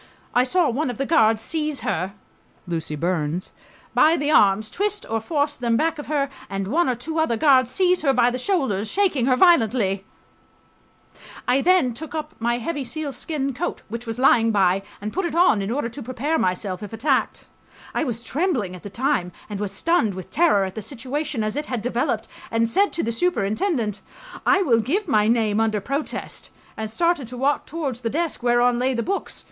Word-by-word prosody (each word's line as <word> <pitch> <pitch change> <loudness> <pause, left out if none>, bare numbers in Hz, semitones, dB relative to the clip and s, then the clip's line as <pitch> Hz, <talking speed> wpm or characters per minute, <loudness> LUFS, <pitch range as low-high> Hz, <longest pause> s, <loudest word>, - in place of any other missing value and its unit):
I... 245 - +4
saw 335 +6 +2
one 265 +4 -1
of 245 - -5
the 275 - -1
guards 225 -9 +4
seize 305 +2 -2
her 185 +4 -2 0.5
[Lucy 165 -3 -3
Burns] 170 +1 -2 0.4
by 325 +2 +5
the 290 +1 0
arms, 210 -4 +4
twist 415 +1 -1
or 225 0 -1
force 290 +3 -1
them 235 -2 +1
back 325 +2 0
of 295 - -7
her, 290 -2 0 0.2
and 195 0 -3
one 320 +3 +2
or 250 - +1
two 320 +7 -4
other 280 -8 +1
guards 260 -3 +4
seize 360 +6 +2
her 280 -3 +3
by 245 -2 +3
the 250 - -3
shoulders, 250 - 0
shaking 345 - +1
her 255 - +4
violently.... 225 - +3 1.4
I 255 +2 +3
then.. 350 -7 +3
took 315 +6 -7
up 310 - -4
my 235 +1 0
heavy 285 +4 -3
sealskin 280 0 -3
coat, 250 - -4
which 235 +2 -6
was 225 0 -3
lying 240 -3 +4
by, 195 -3 +3 0.2
and 210 +1 -4
put 380 - -1
it 335 -3 -2
on, 340 - +4
in 195 - -3
order 255 +1 -1
to 280 +4 -9
prepare 260 +6 -1
myself 185 0 -1
if 210 0 -8
attacked.... 265 +4 0 0.5
I - - 0
was 235 -5 -2
trembling 260 - -1
at 180 - -11
the 205 - -8
time 190 -5 0 0.2
and 205 - -4
was 205 -2 -2
stunned 220 - +1
with 185 -2 -8
terror 300 - +3
at 190 - -6
the 220 - -5
situation 270 +2 -3
as 215 0 -2
it 295 +1 -3
had 245 -4 -3
developed, 245 0 -1 0.2
and 230 0 +1
said 395 - +2
to 335 - -1
the 230 - -1
superintendent, 230 - 0 0.5
"I 385 +1 +5
will 235 -9 +3
give 360 - -1
my 215 -7 +3
name 220 -2 +2
under 220 -1 +1
protest," 275 +8 -4 0.3
and 220 0 -4
started 335 +1 0
to 250 +2 -8
walk 275 +3 0
towards 280 -7 -4
the 230 - -1
desk 325 +3 -2
whereon 240 0 +3
lay 255 +1 +1
the 235 - -1
books. 395 +2 -3
250 Hz, 200 wpm, -23 LUFS, 220-305 Hz, 1.4 s, by